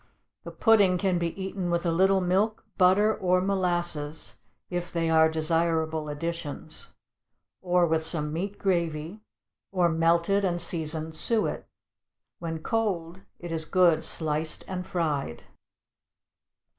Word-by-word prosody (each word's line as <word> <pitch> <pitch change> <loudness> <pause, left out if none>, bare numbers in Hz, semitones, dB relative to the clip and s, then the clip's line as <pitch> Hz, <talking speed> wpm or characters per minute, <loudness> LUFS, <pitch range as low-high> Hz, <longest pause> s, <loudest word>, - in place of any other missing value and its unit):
The - - -7
pudding 205 -5 +4
can 185 -1 +1
be 170 +2 -3
eaten 190 -1 -3
with 170 +1 0
a 170 - +2
little 190 +3 +3
milk, 195 +5 0
butter, 200 +4 +4
or 180 -1 +2
molasses, 175 -5 -1 0.3
if 175 0 -4
they 165 -1 0
are 160 0 +5
desirable 160 -1 0
additions; 165 0 -5 0.7
or 180 -1 +3
with 160 -1 +1
some 150 -2 -2
meat 195 +5 -3
gravy, 170 0 -1 0.5
or 180 -3 +2
melted 170 +4 +2
and 175 -2 0
seasoned 160 -2 -2
suet. 225 +5 0 0.7
When 165 -2 -5
cold 190 -6 -2 0.2
it 175 -1 -8
is 160 -1 -2
good 170 -3 +3
sliced 155 0 -2
and 185 -1 -5
fried. 150 - -2
170 Hz, 125 wpm, -27 LUFS, 160-185 Hz, 0.7 s, are